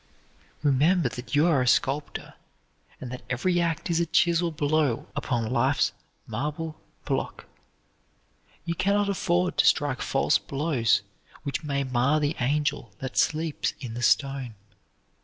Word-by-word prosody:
Remember 150 +2 +3
that 125 +3 -5
you 150 +3 +5
are 155 -6 +3
a 125 - 0
sculptor 140 +4 0 0.7
and 125 - -7
that 125 - -6
every 175 +8 +1
act 165 -1 -1
is 170 -1 +1
a 170 - +1
chisel 170 +1 +3
blow 150 -5 0
upon 120 -2 -1
life's 130 +3 +2 0.3
marble 150 +7 -4 0.2
block. - - -3 1.2
You 170 - -1
can 200 +4 +1
not 205 -1 +1
afford 180 -2 0
to - - +5
strike 145 -3 +2
false 135 - +2
blows 135 -8 +1 0.4
which 140 +2 -3
may 140 -2 -1
mar 130 +3 +2
the 150 +1 0
angel 145 -2 0
that 130 0 -6
sleeps 160 -1 0
in 125 -6 -6
the 120 - -5
stone. 135 0 +1
145 Hz, 140 wpm, -26 LUFS, 130-165 Hz, 1.2 s, you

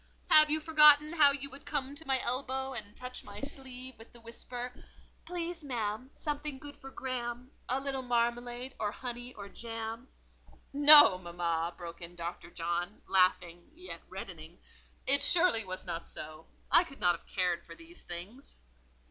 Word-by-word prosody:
"Have 305 0 +9
you 310 +1 +3
forgotten 305 -1 +6
how 300 -4 +7
you 280 0 -2
would 275 +1 -11
come 280 -2 -3
to 305 +1 -10
my 265 -1 +2
elbow 265 +1 -2
and 210 -4 -8
touch 250 0 -6
my 205 0 -9
sleeve 260 -2 -8
with 225 - -14
the 240 - -14
whisper, 245 +2 -6 0.5
'Please, 345 -1 -4
ma'am, 235 -2 -3
something 295 -2 -4
good 285 +1 -10
for 270 -1 -11
Graham—a 255 0 -4
little 270 -1 -3
marmalade, 240 +1 -1
or 210 -1 -1
honey, 245 +1 -7
or 200 -1 -8
jam?'" 225 +2 -6 0.7
"No, 290 -9 +9
mamma," 170 -1 -2
broke 170 -1 -9
in 170 +1 -9
Dr. 170 0 -6
John, 175 +3 -3
laughing, 180 -2 +1
yet 360 +3 -8
reddening; - - -9 0.5
"it 280 +1 +4
surely 330 -6 +5
was 185 -1 -7
not 170 -2 -5
so: 155 +1 -9 0.2
I - - +7
could 275 -6 -13
not 175 -1 +3
have - - -16
cared 180 -3 -1
for - - -12
these 335 +2 -15
things." 190 +11 -10
250 Hz, 160 wpm, -31 LUFS, 200-280 Hz, 0.7 s, Have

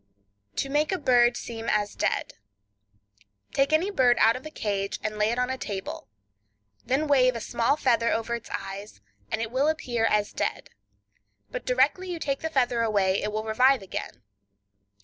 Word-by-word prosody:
To - - -1
Make 295 +2 +1
a 380 - +1
Bird 245 -5 +4
Seem 230 -1 -5
as 210 -1 0
Dead.—Take 100 - -5
any 335 +6 +2
bird 250 -8 +4
out 225 +1 +5
of 255 - -7
a - - -7
cage, 200 -8 -2
and 215 0 -3
lay 210 +1 +3
it 235 - -1
on 250 +1 0
a 260 - -4
table; 195 -2 -5 0.8
then 270 +5 0
wave 255 -4 +4
a - - -3
small 235 +5 0
feather 235 -5 +2
over 230 +1 -1
its 235 -1 -5
eyes, 195 - -6 0.3
and 225 - -1
it 225 - -5
will 265 +4 +2
appear 250 -8 0
as 210 -2 +1
dead; - - -3 0.8
but - - -6
directly 275 +9 +2
you 350 - -3
take 275 -4 -2
the 320 - -3
feather 250 -5 +1
away 200 -4 +2
it 210 - -2
will 215 +1 -2
revive 250 +2 +3
again. 125 -10 -6
235 Hz, 175 wpm, -26 LUFS, 205-265 Hz, 0.8 s, out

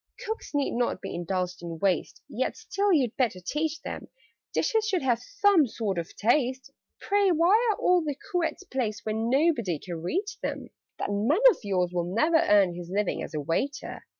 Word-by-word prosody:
"Cooks 440 -8 -5
need 285 -1 +1
not 240 -5 -1
be - - -6
indulged 180 +1 -3
in 170 -1 -6
waste; 190 +2 -1
Yet - - -2
still 400 0 0
you'd 265 - +2
better 230 -8 +1
teach 300 - -2
them - - -6 0.4
Dishes 445 -2 +1
should 375 -8 0
have 240 -3 +1
some 400 -1 +3
sort 210 -5 -2
of 165 - -7
taste. 255 +3 +1 0.3
Pray, 405 -1 +2
why 340 +2 +4 0.2
are 420 - +1
all 360 -1 +3
the 295 -2 -2 0.2
cruets 355 +1 -1
placed 225 - -3
Where 215 - -1
nobody 235 - +1
can 170 0 -7
reach 405 - -3
them? - - -4 0.3
"That - - -3
man 215 - +2
of - - -6
yours 180 -3 0
will 175 -1 0
never 320 +7 +4
earn 205 - +4
His 175 0 -8
living 200 +1 -1
as - - -6
a - - -1
waiter! 275 - -3
245 Hz, 185 wpm, -27 LUFS, -, 0.4 s, why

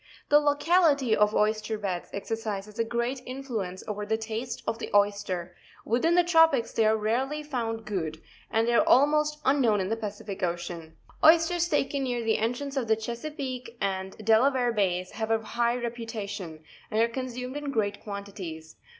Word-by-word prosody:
The 295 - +7
locality 290 -4 +3
of 210 0 +3
oyster 215 +1 +1
beds 190 -4 -3
exercises 210 0 -4
a - - +4
great 235 +3 -2
influence 235 -9 -5
over 210 0 -3
the 220 +1 0
taste 225 +2 -5
of 225 0 -2
the - - -5
oyster; 200 -4 +1 0.3
within 285 +10 +2
the 355 - +5
trepics 325 -8 +4
they 220 -1 +3
are 220 0 +3
rarely 260 +8 -1
found 230 -6 -3
good, 165 -7 -3 0.3
and 225 +1 +1
they 240 - +2
are - - +4
almost 300 +3 +4
un 275 +1 +3
known 220 -4 +3
in 190 0 -1
the 225 - +1
Pacific 205 -2 -6
Ocean. 170 -2 -4 0.3
Oysters 335 +2 +5
taken 280 -2 0
near 245 -3 -1
the 225 -1 +1
entrance 245 +6 -2
ef 250 -4 -1
the 220 - +4
Chesapeake 245 +1 -5
and 190 -1 -2
Delaware 245 +2 +4
Bays 185 -3 0
have 220 -1 -4
a 225 - +4
high 235 +2 0
reputation, 215 -8 -5 0.3
and 215 - 0
are 230 - +5
consumed 250 +1 -5
in 290 -1 -4
great 205 -6 -1
quantities. 195 -6 -7
225 Hz, 170 wpm, -27 LUFS, 205-260 Hz, 0.3 s, The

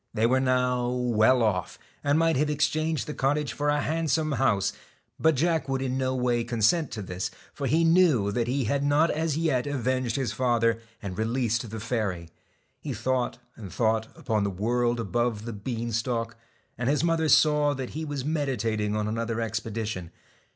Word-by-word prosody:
They 110 +1 +2
were 130 +3 +3
now 125 -1 +1
well 125 -1 +3
off, 95 -5 -1 0.3
and 145 +1 +2
might 165 0 +3
have 150 +3 +1
exchanged 155 0 0
the 150 - -5
cottage 140 -2 0
for 145 +3 -1
a 145 0 +2
handsome 160 0 0
house, 100 -6 +1 0.5
but 160 -1 +4
Jack 160 0 +1
would 135 0 0
in 130 -1 -2
no 130 0 0
way 120 -2 +1
consent 120 +6 +2
to 105 - -4
this, 90 0 -4 0.2
for 140 - -3
he 160 +6 +3
knew 165 - +4
that 115 +3 -1
he 135 +2 0
had 140 +5 0
not 145 +3 +3
as 155 -1 -1
yet 150 -5 +1
avenged 130 -3 -1
his 130 -5 -1
father, 115 -2 +1 0.2
and 95 -1 -5
released 115 0 0
the 110 +1 -6
fairy. 105 -7 -2 0.5
He - - -5
thought 130 -1 -1 0.2
and 100 -5 -9
thought 110 +2 +1
upon 110 -2 0
the 100 - 0
world 120 +5 0
above 115 0 -1
the 115 - -5
bean 115 +3 -4
stalk, 115 0 -2 0.4
and 125 +1 0
his 150 +2 +1
mother 165 -2 +1
saw 150 -1 +4
that 130 -2 -5
he 160 - -4
was 145 -4 -4
meditating 115 -9 -1
on 105 0 -1
another 115 +1 -2
expedition. 110 -4 -3
125 Hz, 180 wpm, -27 LUFS, 110-145 Hz, 0.5 s, but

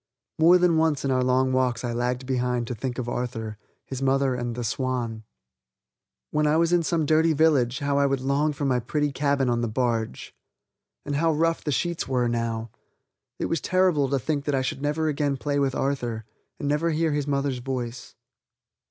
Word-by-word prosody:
More 170 +3 +7
than 175 -2 +3
once 160 -3 +1
in 135 - +1
our 130 -1 +2
long 130 +1 +2
walks 125 -2 +1
I 120 -1 -2
lagged 125 +2 -1
behind 125 -2 0
to 125 - -4
think 125 +2 -4
of 125 -2 -3
Arthur, 115 -3 -4 0.3
his 130 -1 -6
mother, 135 0 +2
and 120 -1 -3
the 120 - -4
Swan. 115 -2 -2 1.1
When 150 0 +2
I 150 +1 +3
was 170 +1 +2
in 175 - +4
some 165 -1 0
dirty 160 +2 +3
village 140 -5 +3
how 140 -1 0
I 140 - +4
would 135 -1 0
long 140 +4 +1
for 145 0 -4
my 130 -2 +2
pretty 145 +5 -1
cabin 140 -1 +1
on 120 -1 +1
the 120 - 0
barge. 115 - -2 0.7
And 145 -1 -2
how 165 +2 +2
rough 165 +2 +1
the 150 - -1
sheets 170 +4 -1
were 125 -2 +1
now. 115 -1 -2 0.7
It - - -2
was 165 - -1
terrible 180 -7 +2
to 140 - +1
think 145 +2 -2
that 145 - +1
I 130 - +1
should 135 - -3
never 150 +2 0
again 145 -2 0
play 145 +1 -1
with 135 -2 +1
Arthur, 120 -5 -2 0.3
and 145 - -4
never 150 +3 +1
hear 160 0 +1
his 145 -1 -1
mother's 140 -2 0
voice. 125 -1 -5
135 Hz, 200 wpm, -25 LUFS, 125-150 Hz, 1.1 s, More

